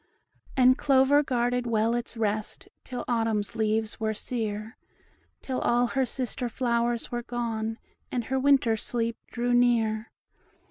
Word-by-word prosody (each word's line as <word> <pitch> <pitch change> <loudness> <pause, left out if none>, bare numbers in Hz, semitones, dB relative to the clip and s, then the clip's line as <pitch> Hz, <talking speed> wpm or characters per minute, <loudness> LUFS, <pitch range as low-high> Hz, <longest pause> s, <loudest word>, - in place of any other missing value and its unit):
And 255 0 +5
Clover 275 +1 +5
guarded 245 -2 0
well 225 0 +2
its 240 0 -4
rest, 215 -1 -2 0.2
Till 250 -2 -6
Autumn's 225 -3 0
leaves 220 0 0
were 220 -1 -1
sere, 215 -1 -4 0.7
Till 260 -1 -2
all 240 +1 +2
her 265 -2 0
sister 250 -1 -2
flowers 235 -1 0
were 240 0 -2
gone, 225 -2 -3 0.3
And 245 -2 -1
her 265 +3 -1
winter 265 -4 +4
sleep 230 +1 -2
drew 245 0 -1
near. 230 -2 +2
235 Hz, 135 wpm, -27 LUFS, 220-250 Hz, 0.7 s, And